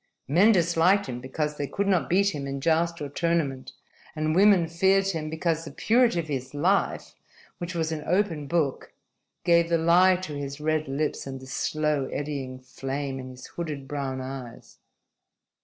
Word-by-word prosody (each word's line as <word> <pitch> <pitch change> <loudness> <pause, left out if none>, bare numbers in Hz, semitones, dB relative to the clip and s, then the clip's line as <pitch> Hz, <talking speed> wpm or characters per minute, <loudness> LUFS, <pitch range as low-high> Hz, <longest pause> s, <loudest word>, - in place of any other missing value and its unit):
Men 180 +11 +5
disliked 175 +1 +3
him 125 -2 -6
because 150 +3 -3
they 145 - -2
could 200 - -2
not 185 -4 +2
beat 200 +2 +3
him 140 -2 -4
in 140 0 -4
joust 170 +3 +1
or - - -3
tournament; 145 -3 -1 0.4
and 155 0 0
women 195 -2 +6
feared 190 +4 +2
him 160 -4 -3
because 160 0 -1
the 160 - -7
purity 230 - +2
of 165 - -4
his 135 -1 -4
life, 185 +7 0 0.5
which 175 0 -5
was 160 -1 -1
an 155 -1 -4
open 170 -5 0
book, 155 -4 -1 0.5
gave 170 -1 +4
the 170 - +3
lie 175 +3 +5
to 180 -4 -6
his 140 0 -5
red 155 0 0
lips 140 +1 -2
and 135 -1 -6
the 130 - -11
slow 150 +2 -1
eddying 140 -3 -4
flame 135 +1 -5
in 130 0 -7
his 130 0 -11
hooded, 150 -5 -6
brown 135 -2 -3
eyes. 130 -2 -9
155 Hz, 175 wpm, -26 LUFS, 140-170 Hz, 0.5 s, women